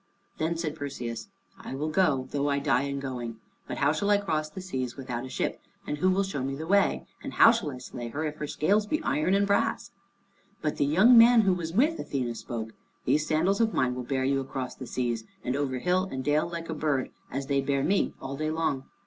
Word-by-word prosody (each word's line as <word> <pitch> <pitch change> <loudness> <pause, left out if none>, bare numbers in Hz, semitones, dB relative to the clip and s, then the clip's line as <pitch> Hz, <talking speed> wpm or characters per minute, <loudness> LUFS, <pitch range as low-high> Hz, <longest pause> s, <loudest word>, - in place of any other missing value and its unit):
Then 165 +1 0
said 155 -3 -3
Perseus, 125 - -5 0.3
"I - - -6
will 150 +3 -2
go, 155 -6 +2
though 145 0 0
I 140 - +1
die 140 -2 +2
in 140 0 -3
going. 120 -4 -5 0.3
But - - -4
how 145 +1 +3
shall 200 +6 -1
I 205 - +6
cross 155 -6 -1
the 155 - -8
seas 130 -10 -4
without 130 -2 -4
a - - -10
ship? - - -2 0.2
And 150 - -3
who 185 - +3
will 190 +1 +2
show 190 -8 -3
me 135 +1 -2
the 155 +3 -5
way? 200 +3 +2 0.2
And - - -6
how 230 - +8
shall 225 -10 -1
I 130 - -6
slay 125 -1 -7
her, 150 +7 -3
if 150 0 -4
her 150 - -4
scales 205 +9 +1
be 310 - 0
iron 180 - +1
and 200 0 +3
brass?" 200 0 0 0.7
But 150 - -2
the - - +2
young 190 - +6
man 235 0 +8
who 195 -3 +3
was 170 -2 -3
with 295 - +3
Athene 125 -4 -2
spoke, 115 -1 -5 0.3
"These 155 0 +2
sandals 180 +7 +2
of 225 -1 +1
mine 125 -1 +2
will 125 - -4
bear 130 +1 -1
you 135 0 +2
across 130 -1 -4
the 130 - -9
seas, 120 -3 -2 0.2
and 125 - -1
over 140 -2 -1
hill 185 +7 +1
and 130 0 -3
dale 150 +4 +1
like 170 -1 -5
a - - -1
bird, 150 -4 -1 0.2
as 135 +1 -3
they 140 0 +1
bear 135 0 0
me 195 +5 +1
all 135 +1 -5
day 155 +2 -2
long. 155 -4 -1
145 Hz, 235 wpm, -28 LUFS, 130-180 Hz, 0.7 s, how